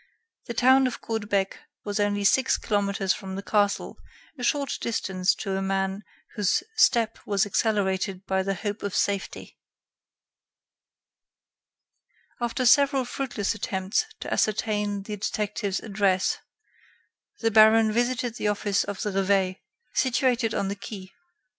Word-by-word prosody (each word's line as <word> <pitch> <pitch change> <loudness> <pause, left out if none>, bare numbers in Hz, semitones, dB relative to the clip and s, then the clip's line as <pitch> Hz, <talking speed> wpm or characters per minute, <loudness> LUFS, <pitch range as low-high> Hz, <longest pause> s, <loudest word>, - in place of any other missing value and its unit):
The 235 - -5
town 260 +2 +5
of 250 - -5
Caudebec 205 -3 -2 0.3
was 205 0 -3
only 205 0 +1
six 260 +6 +3
kilometers 200 -2 0
from 190 -1 -7
the 195 - -5
castle, 205 -1 0 0.4
a 250 - -8
short 280 +3 0
distance 190 -5 0
to 195 -2 -3
a 195 - -1
man 195 +1 -1 0.3
whose 205 -4 +1
step 230 - +3
was 200 -1 +1
accelerated 195 -2 0
by 190 0 0
the 195 +1 -1
hope 205 +3 -4
of 200 -2 -4
safety. 200 -1 -2 2.8
After 240 +2 -1
several 275 +1 +4
fruitless 240 -5 -2
attempts 195 - -1 0.2
to - - -3
ascertain 210 -2 0
the 210 +1 -6
detective's 205 -1 -2
address, 195 -3 0 1.0
the 225 -1 +2
baron 220 0 +6
visited 240 +1 -1
the - - -1
office 205 -1 +1
of 200 -1 -5
the 210 - -1
'Reveil,' 190 -1 +1 0.4
situated 250 -3 +1
on 195 - 0
the 200 - -3
quai. 195 -2 -9
205 Hz, 130 wpm, -26 LUFS, 195-230 Hz, 2.8 s, baron